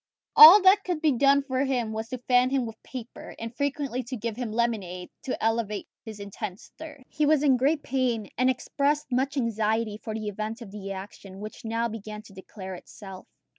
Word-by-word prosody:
All 355 +6 +11
that 390 +2 +6
could 355 -4 -2
be 310 -1 +3
done 275 +2 +3
was 245 -5 -1
to 255 - -4
fan 250 +1 +2
him 265 -2 0
with 225 -1 -9
paper, 250 -3 -9
and 230 +1 -7
frequently 280 -2 -2
to 255 +1 -5
give 230 0 -4
him 240 -2 -4
lemonade 210 -6 -2
to 260 - -2
alleviate 225 -2 -1 0.2
his 220 -3 -9
intense 200 -1 -7
thirst. 305 -4 -10
He 300 -1 0
was 300 -1 +3
in 275 -3 +5
great 290 +4 +1
pain, 245 -5 -1
and 255 +1 +2
expressed 280 +3 -1
much 265 +3 0
anxiety 220 -2 0
for 220 0 -6
the 215 -1 -4
event 215 +3 -4
of 200 - -12
the 195 -1 -7
action, 195 0 -9
which 215 +1 -9
now 230 +1 -1
began 215 -1 -8
to 215 - -16
declare 190 0 -9
itself. 190 +1 -11
230 Hz, 190 wpm, -26 LUFS, 215-270 Hz, 0.2 s, All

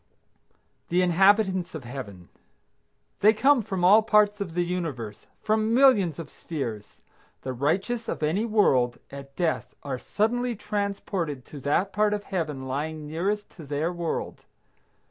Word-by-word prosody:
THE 180 +1 +3
INHABITANTS 190 0 +3
OF 155 - -6
HEAVEN. 105 -8 -8 0.9
They 215 +2 +6
come 265 +4 +4
from 190 -4 -3
all 205 +4 +7
parts 210 -1 +3
of 175 -4 -4
the 175 - +2
universe, 150 - -4 0.2
from 220 +1 +1
millions 215 - +4
of 165 - -8
spheres. 120 -10 -6 0.5
The 130 - -3
righteous 190 - -1
of - - -3
any 165 +8 +1
world, 135 - +2
at 140 0 -10
death, 170 -3 -1
are 135 -3 -4
suddenly 240 - -1
transported 200 - -3
to 145 - -10
that 170 +8 0
part 210 +1 +2
of 205 - -6
Heaven 155 -9 -3
lying 150 +3 -3
nearest 195 +7 -2
to 165 - -9
their 150 +4 -2
world. 170 -2 -4
175 Hz, 145 wpm, -26 LUFS, 145-210 Hz, 0.9 s, all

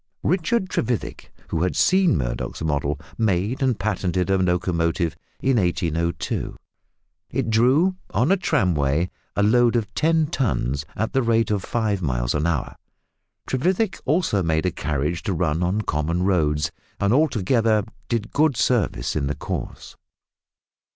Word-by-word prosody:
Richard 190 +5 +1
Trevethick, 120 - -3 0.2
who 80 - -1
had 90 0 0
seen 185 - +4
Murdoch's - - -3
model, 75 -1 -1 0.2
made 105 +4 0
and 130 -4 +2
patented 95 -3 -1
a 95 - +4
locomotive 85 -2 0 0.3
in 135 -2 +2
1802. 85 -3 -1 0.7
It 120 -4 -1
drew 135 +12 +3
on 130 +9 +1
a - - +6
tramway 85 - +1 0.2
a 100 - +2
load 120 +3 +4
of 110 -3 -1
ten 160 0 +2
tons 75 - -1
at 110 - -2
the 135 - +3
rate 115 -2 +2
of 100 -3 0
five 110 -5 -1
miles - - -1
an 75 +2 0
hour. 80 -6 -2 0.7
Trevethick 185 - 0
also 145 - +1
made 80 -1 0
a 90 - +1
carriage 75 +2 -2
to 95 - -2
run 80 -1 0
on 90 +4 +1
common 85 -1 -1
roads, 75 -6 +1 0.3
and 100 +2 +2
altogether 115 -6 +2 0.3
did 115 -2 -2
good 150 -4 +2
service 95 - +1
in 70 -3 0
the 75 - -2
cause. - - -6
95 Hz, 145 wpm, -23 LUFS, 80-125 Hz, 0.7 s, a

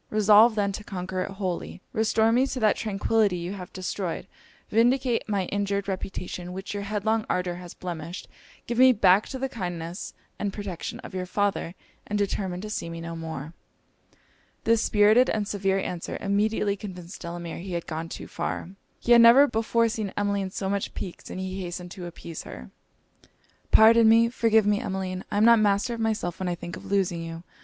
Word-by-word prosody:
Resolve, 215 +2 +6
then, 200 -2 +1
to 210 +2 -6
conquer 185 -1 -4
it - - -7
wholly: 190 -3 -4
restore 220 0 +2
me 255 +3 +3
to 265 - -4
that 215 -2 +3
tranquillity 210 -1 +1
you 175 +2 -4
have 185 -3 -8
destroyed 185 -1 -4 0.5
vindicate 240 +1 +2
my 200 -3 0
injured 200 0 -1
reputation, 185 -2 -5
which 190 +2 -6
your 205 - -3
headlong 215 +2 0
ardour 180 -1 0
has 180 -1 -10
blemished 170 0 -6 0.4
give 240 0 -2
me 260 0 +8
back 200 -1 +4
to 265 - -5
the 270 +1 -2
kindness 175 -6 -5 0.2
and 205 - -1
protection 195 -5 -5
of - - -10
your 185 -1 -3
father 200 -3 -1 0.3
and 210 - -1
determine 190 -3 -2
to 215 - -6
see 170 - -3
me 165 0 -6
no 165 0 -6
more.' 160 -2 -6 1.1
This 230 -1 +3
spirited 215 +5 +4
and 210 -2 -1
severe 195 -2 0
answer, 180 -3 -4
immediately 205 0 +1
convinced 185 -3 -9
Delamere 170 -1 -6
he 185 +1 -6
had 170 -1 -3
gone 165 0 -5
too - - -7
far. 175 - -4 0.3
He 240 - -2
had 235 -1 +9
never 235 +5 +8
before 230 -1 +1
seen 215 -3 -3
Emmeline 200 -1 0
so 190 +1 -4
much 200 0 -2
piqued, 185 -3 -7
and - - -6
he 190 +1 -4
hastened 175 0 -6
to 180 -1 -7
appease 170 -1 -8
her. 65 0 -10 1.0
'Pardon 225 +1 +7
me! 230 +1 +6
forgive 225 -3 +3
me, 205 0 +2
Emmeline! 190 -4 -3
I 205 - -2
am 210 - +5
not 235 -1 +7
master 210 +3 +2
of 230 - -5
myself 220 -6 -1
when 185 -1 -1
I 175 - -1
think 175 0 -7
of - - -10
losing 185 -4 +1
you! 165 0 -7
200 Hz, 190 wpm, -26 LUFS, 180-220 Hz, 1.1 s, had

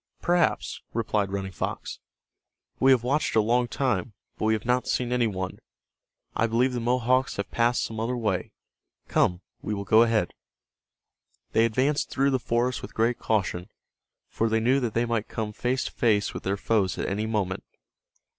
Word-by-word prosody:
"Perhaps," 175 -1 +1
replied 105 -3 0
Running 95 -1 -3
Fox. - - -4 0.8
"We 135 - +5
have 130 -3 +5
watched 140 +2 0
a - - +6
long 120 +3 +2
time, 125 -3 -1 0.2
but - - -3
we 110 - +3
have 110 - -2
not 125 +1 +1
seen 125 -1 0
any 125 -2 +2
one. 95 -3 -4 0.8
I 115 - +2
believe 120 +3 +2
the 120 - -1
Mohawks 125 +2 +1
have 100 - -4
passed 120 +1 +2
some 110 -1 -5
other 120 +3 -1
way. 105 -6 -1 0.6
Come, 90 0 +2 0.2
we 105 - -3
will 100 - -4
go 110 +3 +6
ahead." 115 -6 +2 1.2
They 115 - +4
advanced 130 +6 +1
through 140 +1 +1
the 130 - +1
forest 120 +2 0
with - - -9
great 115 +2 +1
caution, 95 -5 -1 0.6
for 115 - -1
they 110 0 +2
knew 125 +5 +3
that 120 -5 -2
they 115 +1 +2
might 115 -2 -1
come 110 -1 -4
face 125 +4 -1
to - - -5
face 105 -4 +1
with - - -5
their 100 +1 -1
foes 100 -2 +1
at - - -2
any 105 +3 -1
moment. 100 -4 -1
115 Hz, 180 wpm, -26 LUFS, 105-125 Hz, 1.2 s, a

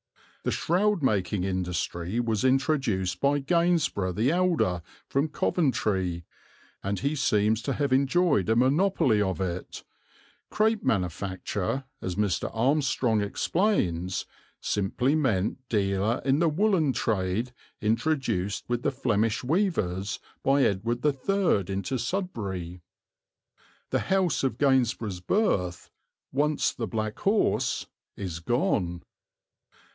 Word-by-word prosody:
The - - 0
shroud 190 0 +1
making 105 -5 +1
industry 90 +1 -2
was 115 -3 0
introduced 130 - +1
by 140 +1 +3
Gainsborough 155 - +1
the 115 +9 +1
elder, 170 - +1 0.3
from 140 +3 +1
Coventry, 95 - 0 0.6
and 100 +1 -2
he 140 +3 0
seems 110 -5 +2
to 135 +3 -2
have 140 -2 0
enjoyed 140 - +2
a 110 - +4
monopoly 130 - +3
of 95 -2 -1
it; 90 -1 -4 0.7
"crape 220 0 +1
manufacture," 95 +2 -1 0.2
as 90 -1 -3
Mr. 100 -3 0
Armstrong 125 -2 +1
explains, 100 - 0 0.3
simply 120 +7 0
meant 115 -9 +1
dealer 100 +2 +1
in 135 +1 +3
the 170 -1 +3
woollen 170 -3 +2
trade 110 +3 -1 0.3
introduced 115 - 0
with 120 0 -1
the - - 0
Flemish 115 -4 0
weavers 125 - 0 0.2
by 140 +1 +3
Edward 115 +6 0
III 145 - +1
into 100 +7 -2
Sudbury. 100 - -4 1.1
The - - +2
house 190 -6 +1
of 130 -4 0
Gainsborough's 125 -8 +1
birth, 90 - 0 0.4
once 150 +2 +1
the 115 -3 -4
"Black 110 -1 -3
Horse," 205 +2 +1 0.3
is 90 -4 -4
gone. 90 -4 0
115 Hz, 110 wpm, -27 LUFS, 95-145 Hz, 1.1 s, a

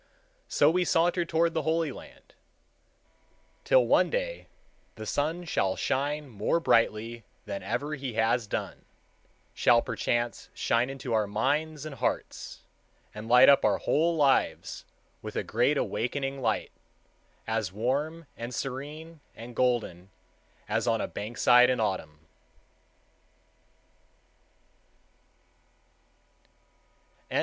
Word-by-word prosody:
So 145 - +4
we 180 +2 +2
saunter 175 +1 +2
toward 165 0 +1
the 160 - 0
Holy 160 +1 0
Land, - - -14 1.3
till - - +4
one - - +4
day - - -3 0.5
the 110 - -8
sun 155 +9 -1
shall 95 - 0
shine 145 +2 -1
more 110 +7 0
brightly 115 -4 +1 0.2
than 100 -2 -5
ever 145 +2 -3
he 135 -4 -5
has 115 +1 +1
done, - - -5 0.7
shall 115 -1 +4
perchance 120 +1 -2
shine 120 +2 +1
into 135 -3 -5
our 110 -2 +2
minds 145 +8 -1
and 155 - -6
hearts, 125 -2 -4 0.5
and 105 +1 -8
light 125 +2 +8
up 140 - +6
our 100 -2 +3
whole 165 +3 +1
lives 140 -4 +1 0.4
with - - -8
a - - -1
great - - +1
awakening 135 +3 -2
light, - - -1 0.7
as 110 -4 -2
warm 145 +10 -2
and 120 +1 -6
serene 150 +5 -6 0.2
and 115 +1 -10
golden 115 -8 0 0.6
as - - -1
on - - +2
a - - -2
bank 105 +3 -7
side 125 0 +6
in 125 -1 +1
Autumn. 95 -8 -2
130 Hz, 115 wpm, -28 LUFS, 115-155 Hz, 1.3 s, light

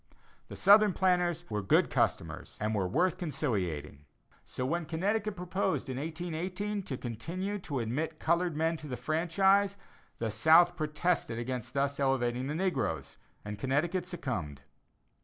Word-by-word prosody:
The - - -8
Southern 205 0 +6
planters 175 -2 +1
were 105 -2 -2
good 95 - +3
customers - - -1
and 105 +1 -1
were 95 -3 0
worth 180 - +1
conciliating. 95 - -2 0.4
So 125 - -4
when 165 +3 -1
Connecticut 205 +6 -1
proposed 180 -2 -1
in 130 - -3
1818 175 +6 -3
to 140 -8 -5
continue 175 - -4
to 150 -6 -4
admit 150 +8 -2
colored 170 0 +1
men 165 +1 +1
to 155 - -9
the 125 -3 -4
franchise, 190 +8 +2 0.4
the 115 -2 -2
South 160 +10 +5
protested 155 -4 0
against 120 0 -4
thus 140 +1 0
elevating 130 -2 +1
the 150 - -2
negroes, 145 - -2 0.3
and 105 0 -6
Connecticut 165 - 0
succumbed. 95 - -4
155 Hz, 140 wpm, -31 LUFS, 125-180 Hz, 0.4 s, Southern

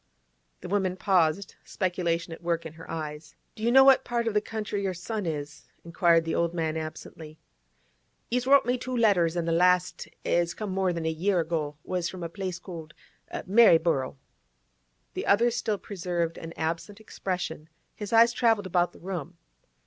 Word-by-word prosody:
The 180 - -7
woman 190 -1 0
paused, 185 -1 +1
speculation 170 -3 -2
at 165 - -11
work 170 -1 -1
in 160 - -7
her 165 +1 -13
eyes. 155 -1 -6 0.2
'Do 220 - -13
you 235 +2 +2
know 265 +2 +8
in - - +4
what 270 -1 +6
part 235 -1 -1
of 225 - 0
the 210 - +2
country 210 -2 -4
your 190 -2 -2
son 205 +2 -4
is?' 150 -1 -5 0.2
inquired 170 0 +3
the 165 - -2
old 170 0 0
man 160 -2 -1
absently. 155 0 -7 0.9
'He's 250 +1 0
wrote 280 -2 +6
me 250 +1 0
two 255 0 -3
letters, 180 -7 +3
an' 170 - -1
the 165 - 0
last, 180 +1 +2 0.2
as 175 0 +1
come 210 -3 -4
more 190 -1 +1
than 170 -2 -4
a 160 - +1
year 180 +4 +1
ago, 155 -3 -2
was 180 -2 -2
from 185 -2 -7
a 170 - -4
place 185 0 -4
called 165 -4 -10 0.5
Maryborough.' 165 - +4 1.0
The - - -4
other 235 +4 +4
still 225 -3 -1
preserved 175 -4 -3
an 165 0 -8
absent 170 +6 -3
expression; 180 -7 -5 0.2
his 210 -2 -7
eyes 230 +1 +6
travelled 225 -4 +2
about 175 -1 +1
the - - -16
room. 175 -2 -6
175 Hz, 180 wpm, -27 LUFS, 165-205 Hz, 1.0 s, know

